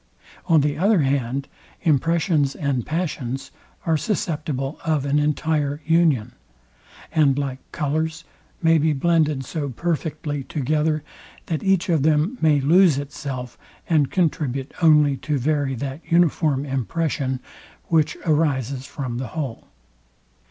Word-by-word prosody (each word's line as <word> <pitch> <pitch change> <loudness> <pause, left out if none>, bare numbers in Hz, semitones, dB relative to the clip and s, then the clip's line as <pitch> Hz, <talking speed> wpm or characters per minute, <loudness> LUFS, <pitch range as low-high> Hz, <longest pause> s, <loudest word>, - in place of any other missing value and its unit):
On 165 -4 +5
the 145 +1 -1
other 200 -1 +4
hand, 135 -1 -1 0.4
impressions 160 -2 +2
and 140 -5 -2
passions 135 -6 -3 0.3
are 160 -1 +2
susceptible 150 - -2
of 155 -4 0
an 145 +1 +2
entire 150 -1 0
union; 155 -8 +3 0.8
and 140 -4 +3
like 135 -2 -2
colours, 160 +1 -2 0.4
may 165 0 +5
be 155 +1 +2
blended 155 -2 +1
so 145 +1 -3
perfectly 150 0 -3
together, 155 +2 0 0.4
that 160 -3 -2
each 195 -2 +2
of 165 -5 +2
them 155 - +2
may 155 -3 +4
lose 165 +2 +5
itself, 135 -3 -6 0.3
and 150 -5 +3
contribute 145 -7 -1
only 150 -4 +5
to 150 +1 -2
vary 140 0 0
that 135 +4 -5
uniform 155 -4 +2
impression, 135 0 -1 0.5
which 160 -3 +2
arises 140 -4 0
from 130 -4 -4
the 130 - -3
whole. 135 -7 -4
150 Hz, 125 wpm, -22 LUFS, 135-160 Hz, 0.8 s, On